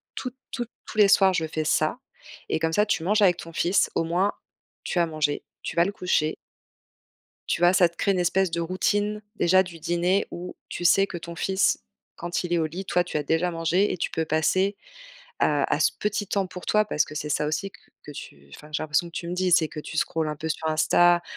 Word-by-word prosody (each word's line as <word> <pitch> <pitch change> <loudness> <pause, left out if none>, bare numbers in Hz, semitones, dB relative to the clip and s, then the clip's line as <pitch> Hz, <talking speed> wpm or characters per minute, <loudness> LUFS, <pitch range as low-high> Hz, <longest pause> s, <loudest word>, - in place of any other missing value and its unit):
tous, 255 -1 -5 0.2
tous, 240 -2 -3 0.2
tous - - -10
les 205 - +8
soirs 195 -1 +5
je 160 -3 0
fais 155 0 -2
ça» 155 +9 +1 0.5
et 160 - 0
comme 160 0 0
ça, 210 +5 +3
tu 190 -6 -1
manges 210 +4 +2
avec 180 -3 +4
ton 165 0 -9
fils, 180 +4 +2
au - - +2
moins, 180 +5 +1 0.5
tu 175 - -1
as 170 - +4
mangé, 155 -2 -1 0.2
tu - - -5
vas 170 - +6
le 200 - -1
coucher. 160 -5 0 1.1
Tu 175 - 0
vois 175 - +6
ça 185 -2 +5
te 170 - -24
crée 200 - +1
une 185 - -1
espèce 185 +1 +2
de 170 - -2
routine, 205 +5 0
déjà, 185 0 +4
du 170 -3 -11
dîner, 175 +4 +1
où, 180 +1 -7
tu 175 - -5
sais 195 +3 +5
que 175 - -7
ton 170 0 -7
fils, 190 - +1 0.3
quand 175 +1 -3
il 175 - -3
est 170 - +3
au 160 - +1
lit, 180 +5 -6
toi 180 -1 +1
tu - - -5
as 150 - 0
déjà 160 +4 +1
mangé 170 +4 +1
et - - -1
tu - - -2
peux 160 - -2
passer 185 +6 +1 0.6
à - - +1
à - - -1
ce - - +3
petit 210 0 -1
temps 195 -1 0
pour 180 -1 -9
toi, 215 0 +3
parce 165 -6 +1
que - - -10
c'est 150 0 -4
ça 150 0 0
aussi 155 +6 -2
que - - -18 0.2
que - - -11
tu 70 - -11
enfin 150 - -14
j'ai 150 - -1
l'impression 155 +2 +1
que - - -16
tu 170 - -4
me 175 - -3
dis 180 -1 0
c'est 160 -2 +4
que, - - -9
heu, - - -5
tu 160 - -7
scroll 160 0 0
un 150 - -3
peu 155 +2 -5
sur 160 0 -3
Insta, 175 +2 +4
175 Hz, 245 wpm, -25 LUFS, 160-190 Hz, 1.1 s, les